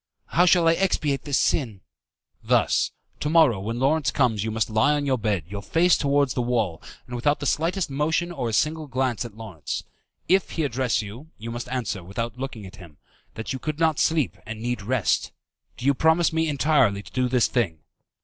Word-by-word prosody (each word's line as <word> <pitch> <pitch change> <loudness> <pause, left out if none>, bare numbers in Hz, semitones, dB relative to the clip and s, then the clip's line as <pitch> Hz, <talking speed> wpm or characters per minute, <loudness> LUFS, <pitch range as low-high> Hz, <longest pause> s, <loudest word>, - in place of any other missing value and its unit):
"How 180 +2 +4
shall 175 -2 +5
I 165 - +6
expiate 160 -6 0
this 145 -3 +1
sin?" 115 -10 0 0.6
"Thus. - - +2 0.3
To 150 - -1
morrow, 155 - +5
when 110 +4 -4
Lawrence 140 +4 +2
comes, 115 -7 +1
you 110 - -2
must 110 0 -1
lie 110 +7 +3
on 145 -1 -1
your 130 -3 +1
bed, 105 -6 0
your 100 +2 -6
face 175 +9 +3
towards 140 -1 +1
the 125 - -1
wall, 115 -9 -1 0.2
and 125 - -7
without 145 +5 +1
the - - -5
slightest 165 - 0
motion 160 +5 0
or 130 -8 -3
a - - -4
single 155 +5 0
glance 130 -2 -1
at 110 -2 -10
Lawrence. 95 -10 -5 0.4
If 190 +1 +3
he 160 - -1
address 130 -4 0
you, 115 +10 -10
you 115 +2 -7
must 120 +1 -6
answer, 120 -7 -3
without 115 +7 -4
looking 125 -6 -5
at 95 - -12
him, 85 -7 -14 0.4
that 110 +4 -4
you 130 - -4
could 155 +1 -4
not 160 -2 +2
sleep, 160 -5 +1
and 110 0 -7
need 120 0 -2
rest. 115 0 0 0.4
Do 125 - -7
you 140 - +5
promise 160 +4 +3
me 160 0 +1
entirely 135 -8 +2
to 90 - -14
do 125 -1 +1
this 125 -2 +3
thing?" 95 - -1
130 Hz, 205 wpm, -24 LUFS, 110-150 Hz, 0.6 s, I